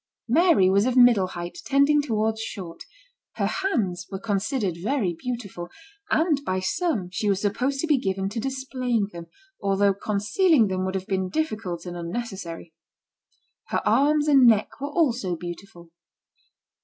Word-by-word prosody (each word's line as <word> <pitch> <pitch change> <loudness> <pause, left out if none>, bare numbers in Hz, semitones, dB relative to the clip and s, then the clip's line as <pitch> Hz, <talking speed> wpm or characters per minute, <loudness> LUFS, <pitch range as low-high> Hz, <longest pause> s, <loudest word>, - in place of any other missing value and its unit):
Mary 305 - +4
was 200 +4 +3
of 255 0 0
middle 240 -6 +6
height, 175 -1 -7
tending 280 +2 +3
towards 220 -4 -1
short 180 -6 -7 0.5
her - - -1
hands 225 - -1
were 195 - -3
considered 205 - -1
very 215 -4 0
beautiful, 200 -4 -6 0.4
and 310 -3 +2
by 185 -8 -1
some 210 - -1
she 205 +3 -1
was 195 -1 +1
supposed 250 +7 -1
to 325 - 0
be 300 -4 +2
given 195 -2 -2
to 210 +3 -4
displaying 255 -3 -1
them, 170 -1 -9 0.3
although 200 0 +2
concealing 215 - +2
them 185 0 -1
would 190 0 -3
have 190 -1 -3
been 190 -1 -1
difficult 215 - -3
and 175 -1 -6
unnecessary. 175 -2 -6 0.9
Her - - -2
arms 290 +6 +3
and 270 -4 +6
neck 220 +4 +2
were 285 - -3
also 250 - 0
beautiful. 175 0 -9
215 Hz, 150 wpm, -25 LUFS, 185-270 Hz, 0.9 s, middle